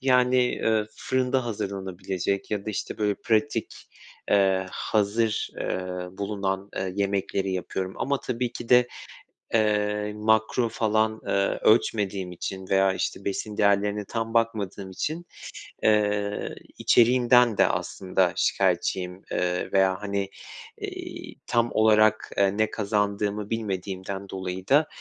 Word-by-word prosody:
yani, 125 -1 +3
eee, 110 -3 +1
fırında 130 0 0
hazırlanabilecek 95 -3 -3
ya 105 -1 -2
da, - - -1
işte, 105 - -4
böyle 105 -1 +1
pratik, 115 +2 0 0.6
eee, 95 -2 +3
hazır, 110 +2 0
eee, - - -1 0.4
bulunan, 100 -1 -2
eee, 95 -1 -2
yemekleri 100 -1 -1
yapıyorum 95 0 -3
ama 140 0 -1
tabii 125 -1 -2
ki 120 - -8
de, 125 0 +6 0.7
eee, 105 -1 +1
makro 110 +2 +2
falan, 110 -2 0
eee, - - -1 0.3
ölçmediğim 100 -4 +2
için 95 +2 -6
veya, 95 0 +3
işte, 95 - -3
besin 105 +1 -3
değerlerine 100 0 +2
tam 115 +2 -4
bakmadığım 105 -4 -1
için, 160 - -4 0.6
eee, 105 -1 +1 0.2
içeriğinden 120 -1 +5
de - - +5
aslında 95 -1 0
şikayetçiyim. 90 0 0
Eee, 90 0 -1
veya, 95 -1 +3
hani, 100 -1 -2 0.5
eee, - - -7
tam 120 0 +2
olarak 110 0 +4 0.2
ne 110 +1 +1
kazandığımı 105 0 -1
bilmediğimden 100 -2 -4
dolayı 95 0 -5
da, 150 +3 +4
105 Hz, 120 wpm, -26 LUFS, 95-115 Hz, 0.7 s, de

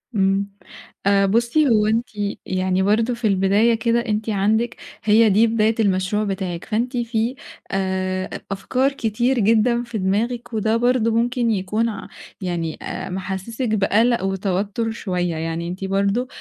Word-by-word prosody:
إمم. 195 0 +1 0.6
آآ 200 0 +4
بُصي 235 +9 +2
هو 215 -2 +3
أنتِ 230 +2 +1 0.4
يعني 185 0 0
برضو 225 +4 +2
في 230 -2 -1
البداية 200 +4 +3
كده 230 +1 +1
أنتِ 215 0 -2
عندِك 220 +3 +1 0.3
هي 220 +1 +5
دي 215 +4 +4
بداية 220 0 +2
المشروع 195 0 +1
بتاعِك، 190 -4 -3
فأنتِ 240 +4 -1
في 235 +1 -1 0.4
آآ 185 -1 -1 0.2
أفكار 255 +8 0
كتير 240 +1 0
جدًا 230 +3 +3
في 235 -2 -5
دماغِك، 225 +5 -1
وده 220 +1 +1
برضو 240 -1 +2
ممكن 240 0 +1
يكون 210 +4 0
ع 210 - -7 0.3
يعني 170 -3 -3
آآ - - -5
محسّسِك 195 +6 -4
بقلق 220 +2 +2
وتوتر 195 +3 -1
شوية، 180 -6 -2
يعني 165 +1 -3
أنتِ 185 +2 -6
برضو 200 +6 0
215 Hz, 145 wpm, -21 LUFS, 190-230 Hz, 0.6 s, هي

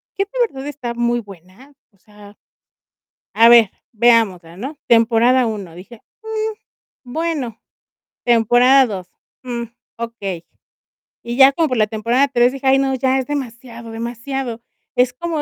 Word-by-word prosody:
"¿Qué 395 - 0
de - - -42 0.2
verdad 270 -6 -9
está 260 -5 -5
muy 240 0 0
buena?". 195 - -16 0.2
O 200 - -32
sea, 205 0 -17 1.0
a 230 +2 +6
ver, 235 -4 +6 0.2
veámosla, 210 -7 +2
¿no? 270 +9 -7
Temporada 235 +2 +4
1, 200 -6 -6
dije: 205 +6 -13 0.2
"Mm, 440 0 -5 0.4
bueno". 305 -8 -3 0.7
Temporada 245 +3 +5
2: 190 -5 -6 0.4
"Mm 240 -2 -4 0.3
okey", 200 -7 -6 0.8
y 235 +1 -5
ya 270 0 +7
como 325 +2 +1
por 255 - -1
la 215 -1 +3
temporada 230 +6 +1
3 245 -1 +3
dije: 270 0 -4
"Ay, 265 0 +5
no, 270 -1 0
ya 260 +1 +1
es 260 - -4
demasiado, 235 -4 -6
demasiado". 235 +1 -5 0.3
Es 250 0 +2
como 325 +3 -3
240 Hz, 145 wpm, -19 LUFS, 225-270 Hz, 1.0 s, ya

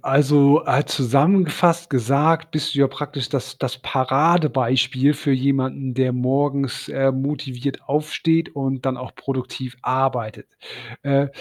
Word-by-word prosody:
also, 145 +1 +4
äh, 140 +3 +1
zusammengefasst 170 - +2
gesagt: 145 +6 +1
„Bist 155 -3 -2
du 140 - -2
ja 140 - +5
praktisch 135 -1 -5
das 135 -1 -4
das 130 -2 -3
Paradebeispiel 130 -1 +1
für 140 -1 -1
jemanden, 130 0 -1
der 130 0 0
morgens, 135 +1 -1
ähm, 135 -1 0
motiviert 135 -1 -4
aufsteht 155 +2 0
und 135 -1 -3
dann 130 -1 -1
auch 125 -1 -9
produktiv 130 -2 -6
arbeitet.“ 125 -4 -2 0.5
Äh, 140 0 +2
135 Hz, 125 wpm, -21 LUFS, 130-145 Hz, 0.5 s, ja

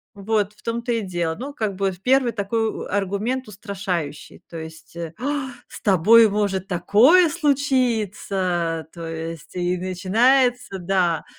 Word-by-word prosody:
Вот, 205 0 -1
в 210 - -24
том-то 235 +1 -2
и 230 - 0
дело. 175 -5 -2
Ну, 265 - -7
как 220 -8 -2
бы 195 0 0
в 180 -1 -11
первый 255 +3 +3
такой 225 +1 -2
аргумент 205 +6 -2
устрашающий, 190 -7 -5
то 170 - -9
есть 160 0 -10
э. 170 -2 -6
"А, 280 +2 -2 0.2
с - - -11
тобой 215 +4 +6
может 195 -2 -1
такое 230 - +5
случиться" 215 - 0
то 170 -1 -7
есть 165 +1 -7
и 180 0 0
начинается, 220 +5 +2
да, 175 -3 0
200 Hz, 140 wpm, -22 LUFS, 180-235 Hz, 0.2 s, тобой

